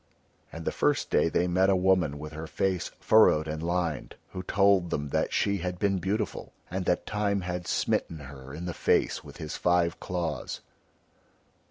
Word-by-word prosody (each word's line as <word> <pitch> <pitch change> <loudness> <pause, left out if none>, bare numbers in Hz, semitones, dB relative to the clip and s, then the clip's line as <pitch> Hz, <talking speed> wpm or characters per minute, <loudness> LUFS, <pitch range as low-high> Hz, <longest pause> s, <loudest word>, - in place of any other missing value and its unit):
And 80 0 -8
the - - +1
first - - 0
day - - +3
they 90 +2 +1
met 95 +2 +3
a 95 - +4
woman 90 -5 +2
with 75 +1 -8
her 80 +1 -6
face 95 +1 -1
furrowed 80 -8 +5
and 80 0 -4
lined, 85 -4 -2 0.2
who 90 - -5
told 100 -2 +3
them 75 -2 -2
that - - 0
she 100 0 +1
had 90 0 -3
been 100 0 +1
beautiful 100 +5 -3 0.2
and 95 0 -2
that 90 - +1
Time 100 -1 0
had 90 0 -4
smitten 80 - 0
her 70 -1 -10
in 80 +5 -6
the 90 - -3
face - - +1
with - - -12
his 75 - -5
five 85 -1 +2
claws. 85 -4 -3
90 Hz, 180 wpm, -28 LUFS, 80-95 Hz, 0.2 s, furrowed